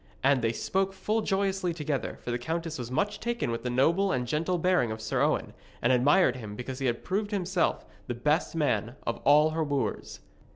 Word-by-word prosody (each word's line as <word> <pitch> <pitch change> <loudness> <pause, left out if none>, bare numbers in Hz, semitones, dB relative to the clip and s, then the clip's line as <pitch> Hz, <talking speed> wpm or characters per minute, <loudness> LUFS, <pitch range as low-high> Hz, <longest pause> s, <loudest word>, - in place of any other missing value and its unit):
And 135 -1 +4
they 115 -1 +1
spoke 190 +10 -1
full 215 +3 -1
joyously 195 -3 0
together, 150 -4 -3
for 120 - -3
the 120 - -1
countess 165 +3 -3
was 120 -1 -5
much 205 +11 -1
taken 235 - -2
with 115 - -3
the 125 - -3
noble 165 +11 +2
and 125 -1 0
gentle 160 +7 0
bearing 175 -9 +2
of 110 - -5
Sir 110 0 -1
Owen, - - +1 0.3
and 120 +2 +3
admired 130 +2 +4
him 105 -4 -7
because 125 +3 -6
he 135 - 0
had 120 -1 -1
proved 205 +3 -1
himself 185 -3 0 0.2
the 120 - -3
best 150 +8 0
man 120 -6 0
of 115 - -1
all 150 +2 +6
her 160 0 0
wooers. 145 -2 -2
150 Hz, 205 wpm, -28 LUFS, 125-185 Hz, 0.3 s, all